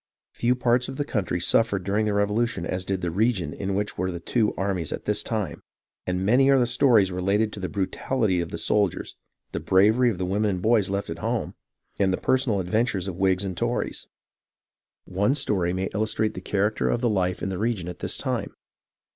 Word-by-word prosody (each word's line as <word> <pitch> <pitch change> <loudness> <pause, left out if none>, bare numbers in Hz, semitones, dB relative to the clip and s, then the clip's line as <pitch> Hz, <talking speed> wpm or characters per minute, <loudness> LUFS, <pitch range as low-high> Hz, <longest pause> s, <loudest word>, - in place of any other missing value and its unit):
Few 120 +1 +1
parts 125 0 +1
of 135 - -6
the 145 - -2
country 95 -9 -1
suffered 100 +2 +2
during 105 +3 0
the 105 - 0
Revolution 105 -2 0
as 90 +1 -2
did 95 -1 -2
the 90 -1 -2
region 95 -5 0
in 95 0 -3
which 105 -1 -3
were 95 +1 0
the 85 - -5
two 110 +5 +1
armies 95 -5 -2
at - - -5
this - - +1
time, - - -3 0.5
and 90 +1 -1
many 130 +6 +4
are 135 - +6
the 125 - +3
stories 120 -5 +3
related 100 +4 0
of 100 - -8
the 90 - -3
brutality 100 0 0
of 85 - -4
the 85 - -5
soldiers, 100 +2 0 0.4
the - - -3
bravery 110 +6 +4
of 105 - -3
the 90 - -2
women 105 +3 0
and 90 -2 -2
boys 110 -3 +3
left 100 -3 -2
at 85 - -6
home, - - -2 0.5
and 95 -1 +3
the 95 - 0
personal 130 -6 +1
adventures 95 +1 0
of 90 -3 -5
Whigs 95 0 +2
and 95 -2 -4
Tories. - - -2 1.0
One 100 +8 +1
story 100 -11 0
may 95 +1 -2
illustrate 110 0 0
the 95 - -7
character 105 +3 0
of 120 - 0
the 125 - +2
life 95 -4 0
in - - -1
the 95 -1 -4
region 110 -6 -1
at 90 - -7
this - - -2
time. - - -3
100 Hz, 210 wpm, -25 LUFS, 90-110 Hz, 1.0 s, are